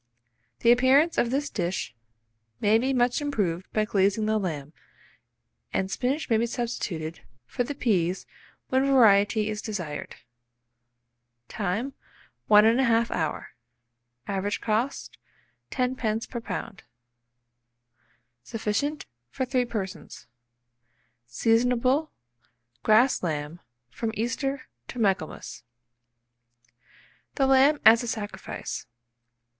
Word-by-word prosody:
The 235 - +6
appearance 265 +7 +4
of 235 - +2
this 280 +3 -1
dish 175 -6 -2 0.7
may 215 +2 +4
be 260 +3 0
much 245 +1 +2
improved 195 -12 -2
by 215 -1 +1
glazing 200 +1 +1
the 215 0 +1
lamb, 155 -6 -4 1.0
and 190 0 -1
spinach 270 +7 -1
may 225 - +3
be 235 +2 +1
substituted 185 -10 -4 0.3
for 245 - -2
the 285 +4 -5
peas 185 -8 0 0.4
when 260 +1 +2
variety 215 -5 +4
is 215 -1 -3
desired. 175 -11 -5 1.3
Time. 215 +7 -2 0.5
1 210 0 +7
1/2 230 0 +3
hour. 160 -3 -2 0.8
Average 200 +1 -2
cost, 230 +5 -2 0.5
10d. 250 -4 -1
per 235 - -4
lb. 230 -2 -5 1.6
Sufficient 225 - -2 0.2
for 260 - -2
3 250 -1 +1
persons. 210 -6 -6 1.0
Seasonable, 245 - +2 0.7
grass 230 - +4
lamb, 155 -1 -3 0.3
from 225 - -3
Easter 260 +4 -2 0.2
to - - -8
Michaelmas. 195 -8 -1 1.7
THE 270 - +2
LAMB 270 +3 +5
AS 225 +1 +8
A 240 - -5
SACRIFICE. 205 - -5
225 Hz, 100 wpm, -26 LUFS, 200-255 Hz, 1.7 s, AS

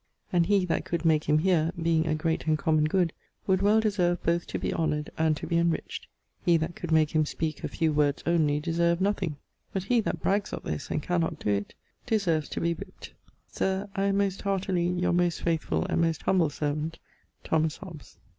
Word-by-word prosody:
And 170 -2 +3
he 200 -2 +3
that 170 - -1
could 170 -1 -3
make 155 -2 +3
him 150 - +3
heare 165 -1 +2
(being 165 -1 +2
a 155 - +1
great 160 0 -1
and 155 -1 +3
common 155 -1 +2
good) 170 +1 +1 0.3
would 190 -1 +2
well 210 +2 +4
deserve 185 -5 +1
both 170 +1 0
to - - -3
be - - -2
honoured 150 -2 -1
and 160 -1 +1
to - - -6
be 170 - +1
enriched. 170 -1 -1 0.4
He 170 -1 +4
that 165 +2 -3
could 175 - -6
make 155 -1 +4
him 155 -1 +3
speake 155 +1 -3
a - - 0
few 160 -2 0
words 145 -1 +1
onely 155 -4 +2
deserved 170 +2 +1
nothing. 190 -5 0 0.4
But 190 - -1
he 235 +4 +2
that - - -3
brags 200 +1 0
of - - -5
this 75 -1 -4
and 150 - -2
cannot 165 -2 0
doe 105 - -1
it, 100 0 -2 0.3
deserves 180 - +1
to - - -3
be 170 0 +1
whipt. 165 - -10 0.4
Sir, 190 +2 -2
I 195 -1 +1
am 200 0 +2
most 195 -1 0
heartily 190 -3 0
Your 180 0 0
most 175 -1 +1
faithfull 165 -1 0
and - - 0
most 165 -2 0
humble 175 -5 +3
servant, 150 +2 -3 0.5
THOMAS 160 -1 0
HOBBES. 170 -8 -11
170 Hz, 210 wpm, -27 LUFS, 155-185 Hz, 0.5 s, well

